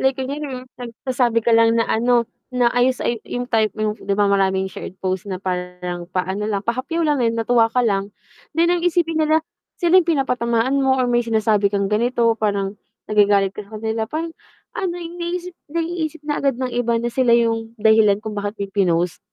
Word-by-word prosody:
like 265 Hz, 0 st, +2 dB
ayun 270 Hz, +3 st, -3 dB
nga, 255 Hz, -1 st, -6 dB, 0.2 s
nagsasabi 240 Hz, -1 st, -1 dB
ka 235 Hz, -, +3 dB
lang 230 Hz, 0 st, +5 dB
na 230 Hz, -, +3 dB
ano, 240 Hz, +1 st, +2 dB, 0.2 s
na 250 Hz, -2 st, +1 dB
ayos 250 Hz, +1 st, +2 dB
ay 235 Hz, -2 st, -1 dB
'yung 245 Hz, -, -3 dB
type 220 Hz, -3 st, +2 dB
mo 215 Hz, -1 st, 0 dB
'di 200 Hz, -2 st, -2 dB
ba, 205 Hz, -, +3 dB
marami 190 Hz, -1 st, +2 dB
'yung 190 Hz, -, -7 dB
shared 185 Hz, -, -8 dB
post 185 Hz, +1 st, -2 dB
na 190 Hz, -, -3 dB
parang 180 Hz, -1 st, -4 dB
paano 190 Hz, +3 st, -2 dB
lang, 200 Hz, -1 st, -2 dB
pahapyaw 270 Hz, +8 st, -1 dB
lang, 295 Hz, -3 st, +1 dB
dahil 230 Hz, -1 st, +1 dB
natuwa 230 Hz, 0 st, +3 dB
ka 250 Hz, +2 st, +1 dB
lang. 200 Hz, -2 st, 0 dB, 0.5 s
Then, 340 Hz, +1 st, +4 dB
ang 350 Hz, -, +1 dB
isipin 330 Hz, -2 st, +1 dB
nila, 315 Hz, +1 st, +2 dB, 0.3 s
sila 355 Hz, +1 st, +5 dB
'yung 340 Hz, -, -5 dB
pinapatamaan 255 Hz, -3 st, +1 dB
mo 265 Hz, -1 st, +3 dB
or 255 Hz, -, +2 dB
may 240 Hz, 0 st, +2 dB
sinasabi 220 Hz, -3 st, +2 dB
kang 200 Hz, 0 st, -1 dB
ganito, 235 Hz, +1 st, +2 dB
parang 200 Hz, -1 st, -1 dB, 0.2 s
nagagalit 205 Hz, -2 st, +3 dB
ka 210 Hz, -, -7 dB
sa 220 Hz, -, -8 dB
kanila, 220 Hz, 0 st, -2 dB
parang 325 Hz, +2 st, -4 dB, 0.4 s
ano 355 Hz, -2 st, -2 dB
'yung 345 Hz, 0 st, -7 dB
naiisip 350 Hz, +1 st, -4 dB
naiisip 325 Hz, 0 st, -3 dB
na 295 Hz, -1 st, -1 dB
agad 275 Hz, -3 st, +1 dB
ng 255 Hz, -1 st, -3 dB
iba 240 Hz, -1 st, +1 dB
na 235 Hz, +1 st, -2 dB
sila 240 Hz, -1 st, +4 dB
'yung 225 Hz, -1 st, -1 dB
dahilan 220 Hz, -2 st, +4 dB
kung 220 Hz, -, -4 dB
bakit 205 Hz, +1 st, -4 dB
mo 200 Hz, -, -3 dB
'yun 195 Hz, -, -11 dB
pinost. 175 Hz, -3 st, +1 dB
230 Hz, 205 wpm, -21 LUFS, 205-265 Hz, 0.5 s, lang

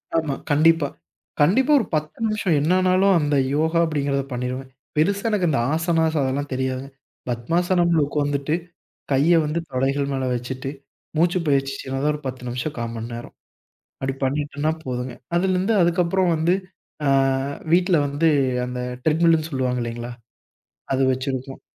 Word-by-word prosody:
ஆமா. 155 Hz, -4 st, 0 dB, 0.2 s
கண்டிப்பா. 160 Hz, +1 st, +4 dB, 0.5 s
கண்டிப்பா, 255 Hz, -, +4 dB
ஒரு 225 Hz, -, -1 dB
10 155 Hz, 0 st, -3 dB
நிமிஷம், 215 Hz, -5 st, 0 dB
என்னானாலும் 185 Hz, +4 st, +3 dB
அந்த 145 Hz, -1 st, +1 dB, 0.2 s
யோகா 160 Hz, +2 st, +2 dB
அப்படிங்கிறத 140 Hz, -3 st, 0 dB
பண்ணீருவேன். 125 Hz, +2 st, -4 dB, 0.3 s
பெருசா 200 Hz, +7 st, +1 dB
எனக்கு 205 Hz, -5 st, +1 dB
அந்த 140 Hz, -, +1 dB
ஆசனாஸ் 160 Hz, -1 st, +1 dB
அதெல்லாம் 135 Hz, +2 st, -2 dB
தெரியாது. 130 Hz, 0 st, -2 dB, 0.4 s
பத்மாசனம்ல 170 Hz, +7 st, +2 dB
ஒக்காந்துட்டு, 145 Hz, +1 st, 0 dB, 0.6 s
கைய 145 Hz, +6 st, +4 dB
வந்து 150 Hz, +2 st, -1 dB
தொடைகள் 135 Hz, +2 st, 0 dB
மேல 130 Hz, -1 st, -1 dB
வச்சுட்டு 130 Hz, +2 st, -4 dB, 0.5 s
மூச்சு 175 Hz, +3 st, +3 dB
பயிற்சி, 135 Hz, -1 st, +1 dB
சின்னதா 135 Hz, +2 st, -2 dB
ஒரு 150 Hz, -, -6 dB
10 130 Hz, -1 st, -5 dB
நிமிஷம், 125 Hz, +5 st, -3 dB
1/4 115 Hz, 0 st, -3 dB
மணி 115 Hz, 0 st, -5 dB
நேரம். 120 Hz, +1 st, -8 dB, 0.7 s
அப்படி 135 Hz, 0 st, -2 dB
பண்ணிட்டோன்னா 145 Hz, +2 st, -1 dB
போதுங்க. 125 Hz, -1 st, -4 dB, 0.2 s
அதிலருந்து 185 Hz, +3 st, +2 dB
அதுக்கப்புறம் 175 Hz, +1 st, +2 dB
வந்து, 165 Hz, +3 st, +2 dB, 0.5 s
அ -, -, +3 dB, 0.6 s
வீட்ல 180 Hz, 0 st, +4 dB
வந்து 145 Hz, +4 st, +1 dB, 0.4 s
அந்த 125 Hz, 0 st, -4 dB, 0.2 s
ட்ரெட்மில்னு 160 Hz, 0 st, +3 dB
சொல்லுவாங்க 130 Hz, -3 st, -1 dB
இல்லைங்களா, 120 Hz, +1 st, -5 dB, 0.8 s
அது 135 Hz, -, +2 dB
வச்சிருக்கோம். 130 Hz, 0 st, -4 dB
145 Hz, 130 wpm, -23 LUFS, 130-170 Hz, 0.8 s, கண்டிப்பா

